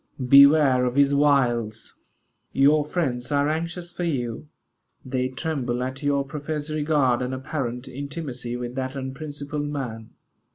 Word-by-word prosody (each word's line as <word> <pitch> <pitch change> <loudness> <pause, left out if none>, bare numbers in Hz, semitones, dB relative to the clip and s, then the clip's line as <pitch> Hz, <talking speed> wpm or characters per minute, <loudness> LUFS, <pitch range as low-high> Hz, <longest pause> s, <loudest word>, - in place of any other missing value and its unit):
Beware 140 -1 +7
of 125 0 -1
his 140 0 +4
wiles. 120 -6 +1 0.6
Your 145 +3 +4
friends 140 -5 -2
are 145 0 +2
anxious 170 +3 -3
for 175 - -5
you. 130 -5 -2 0.6
They 130 0 -1
tremble 130 -3 -2
at 130 +2 -5
your 140 -1 +1
professed 150 +2 -5
regard 145 -5 +1
and 125 +1 -2
apparent 130 -2 -4
intimacy 135 -3 -5
with 120 0 -5
that 130 +1 -4
unprincipled 145 +2 -5
man." 120 -6 -5
140 Hz, 130 wpm, -24 LUFS, 125-150 Hz, 0.6 s, Beware